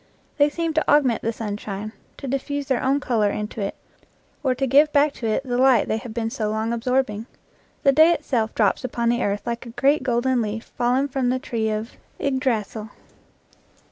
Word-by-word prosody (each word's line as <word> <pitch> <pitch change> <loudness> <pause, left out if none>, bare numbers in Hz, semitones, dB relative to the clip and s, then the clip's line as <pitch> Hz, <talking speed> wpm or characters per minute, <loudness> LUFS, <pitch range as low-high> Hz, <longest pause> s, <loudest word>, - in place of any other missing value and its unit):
They 290 +1 +5
seem 330 +1 -2
to 315 - 0
augment 275 -6 +3
the 230 - -1
sunshine, 210 -1 -5 0.3
to 275 - -7
diffuse 280 +2 -2
their 260 -3 0
own 270 +2 +2
color 225 -6 +1
into 210 +1 -4
it, 195 - -3 0.7
or 260 -2 +2
to 270 - 0
give 285 +4 +5
back 290 0 +3
to 230 - -4
it 220 +4 0
the 245 -2 -2
light 260 -2 +5
they 220 - 0
have 230 +1 -7
been 225 0 -2
so 215 -2 -2
long 220 +2 -1
absorbing. 235 -2 -1 0.6
The 275 - +6
day 315 +4 +6
itself 235 -9 -1
drops 210 +1 +2
upon 235 -2 -1
the 240 +1 +1
earth 205 0 -1
like 235 +1 -4
a 235 - -12
great 285 +3 +3
golden 250 0 +1
leaf 220 +1 -3
fallen 250 +3 +1
from 265 -2 -1
the 255 - +1
tree 225 -3 -2
of 215 +2 -4 0.2
Ygdrasyl. 240 -5 -1
245 Hz, 195 wpm, -23 LUFS, 220-270 Hz, 0.7 s, The